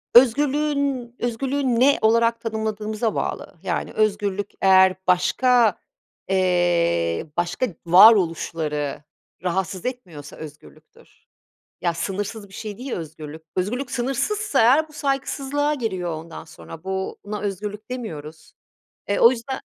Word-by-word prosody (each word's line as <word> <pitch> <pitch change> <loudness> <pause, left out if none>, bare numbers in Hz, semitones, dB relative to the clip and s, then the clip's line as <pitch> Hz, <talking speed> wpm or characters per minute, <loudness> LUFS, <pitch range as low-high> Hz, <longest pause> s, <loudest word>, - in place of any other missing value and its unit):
Özgürlüğün 275 0 +3
özgürlüğü 255 +1 -1
ne 280 +2 +5
olarak 230 +1 +3
tanımladığımıza 220 0 -2
bağlı, - - -3
yani, - - -2
özgürlük 205 -1 0
eğer 190 -1 +6
başka, 230 +4 +3 0.5
eee, 175 - +1
başka 175 +9 0 0.2
varoluşları 165 -6 +4 0.4
rahatsız 185 +1 -2
etmiyorsa 175 - -6
özgürlüktür. 145 - -14 0.6
Ya, 170 -2 0
sınırsız 200 +4 -4
bir 195 - -16
şey 210 -3 -7
değil 255 +1 -6
özgürlük. 160 -1 -7
Özgürlük 245 +8 -2
sınırsızsa 335 - 0
eğer 275 +8 +4
bu 305 - -18
saygısızlığa 285 +1 -1
giriyor 185 -9 -3
ondan 160 +1 -8
sonra, 160 +1 -12
bu 190 0 -3
buna 210 0 -5
özgürlük 205 +2 -5
demiyoruz. 160 -11 -7 0.6
Eee, 200 - +1
o 235 - +8
yüzden 260 +2 -4
210 Hz, 110 wpm, -23 LUFS, 175-250 Hz, 0.6 s, o